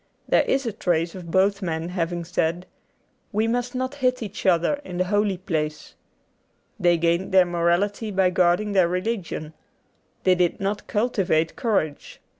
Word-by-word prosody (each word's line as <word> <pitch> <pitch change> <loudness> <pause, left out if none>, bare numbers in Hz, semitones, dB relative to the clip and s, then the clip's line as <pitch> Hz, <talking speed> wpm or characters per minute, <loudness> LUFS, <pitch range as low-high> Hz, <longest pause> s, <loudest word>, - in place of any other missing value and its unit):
There - - +4
is 270 0 0
a 230 - -1
trace 170 -5 0
of 180 -3 -9
both 195 +3 +2
men 165 -2 -3
having 175 -1 -2
said, 170 +1 -1 0.7
'We 220 +1 +1
must 245 +1 -2
not 260 +1 -2
hit 255 -3 0
each 205 -2 -5
other 185 - +2
in 180 -7 -7
the 185 - +2
holy 205 0 +1
place.' 155 -4 -3 0.9
They 175 -2 +4
gained 170 +3 0
their 185 -1 +6
morality 175 +5 0
by 190 -2 +2
guarding 180 +4 +2
their 190 -3 +4
religion. 180 -4 -3 0.7
They 185 - +5
did 180 -1 +1
not 200 +1 -3
cultivate 195 -8 0
courage. 195 - -2
185 Hz, 155 wpm, -24 LUFS, 170-210 Hz, 0.9 s, their